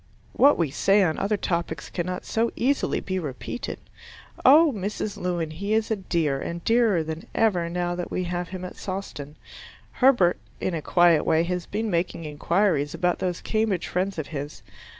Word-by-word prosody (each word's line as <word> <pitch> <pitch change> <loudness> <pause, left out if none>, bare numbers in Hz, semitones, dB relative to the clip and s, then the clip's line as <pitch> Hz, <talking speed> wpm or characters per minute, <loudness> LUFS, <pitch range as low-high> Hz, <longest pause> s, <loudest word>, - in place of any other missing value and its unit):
What 285 +2 +5
we 165 -5 0
say 195 +7 +3
on 160 -4 0
other 205 +1 0
topics 170 -6 -3
cannot 180 +1 -3
so 230 +1 0
easily 275 +3 0
be 185 -1 -2
repeated! 150 - -5 0.7
Oh, 300 +3 +7
Mrs 205 +1 -3
Lewin, 175 -3 -2
he 200 +7 -1
is 220 0 0
a - - +3
dear, 165 -8 -1
and 170 0 -5
dearer 225 -7 +3
than 160 +1 -6
ever 180 -7 +2
now 175 0 -1
that 175 0 -4
we 185 - -2
have 175 0 -3
him 185 -1 -6
at 180 - -9
Sawston. 185 -7 -6 0.6
Herbert, 240 -10 +4 0.2
in 185 - -2
a 160 - -2
quiet 175 0 +4
way, 160 0 +3
has 180 0 -3
been 215 +1 -2
making 170 -1 -1
inquiries 155 0 0
about 180 -1 0
those 180 -2 -2
Cambridge 215 -5 0
friends 185 +1 -2
of 155 - -3
his. 145 -1 -6
180 Hz, 175 wpm, -25 LUFS, 165-205 Hz, 0.7 s, Oh